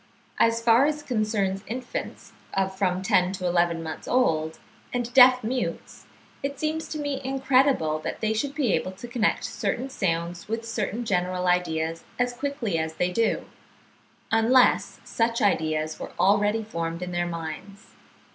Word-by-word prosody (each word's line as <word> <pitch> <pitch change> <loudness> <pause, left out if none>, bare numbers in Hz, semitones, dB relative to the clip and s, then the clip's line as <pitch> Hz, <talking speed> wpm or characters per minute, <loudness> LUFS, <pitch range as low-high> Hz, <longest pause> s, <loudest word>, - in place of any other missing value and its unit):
As 230 0 +3
far 235 +4 +5
as 300 -1 -2
concerns 210 -6 -1
infants 255 - -6 0.2
of 190 0 0
from 190 -1 0
ten 190 -4 +3
to 185 -1 -5
eleven 170 -1 +1
months 160 -1 -7
old, 160 -11 +1 0.3
and 245 -1 -3
deaf 255 -1 +7
mutes, 250 +3 -4 0.3
it 280 0 -4
seems 315 +1 -2
to 310 - -5
me 285 -2 -3
incredible, 265 - +2
that - - -5
they 220 0 0
should 275 +6 -2
be 270 -9 +1
able 185 - -1
to 195 +6 -9
connect 235 -2 0
certain 265 +2 -3
sounds 170 -3 -2
with 225 +1 -3
certain 225 +1 -2
general 180 -2 0
ideas 165 -2 0
as 245 0 0
quickly 245 - -2
as 160 0 -3
they 180 +2 0
do, 230 +4 0 0.9
unless 230 +3 +4
such 230 0 0
ideas 155 -4 0
were - - -7
already 205 +2 +3
formed 170 -4 -4
in 180 - -5
their 175 0 -1
minds. 170 +4 -7
210 Hz, 155 wpm, -26 LUFS, 175-250 Hz, 0.9 s, deaf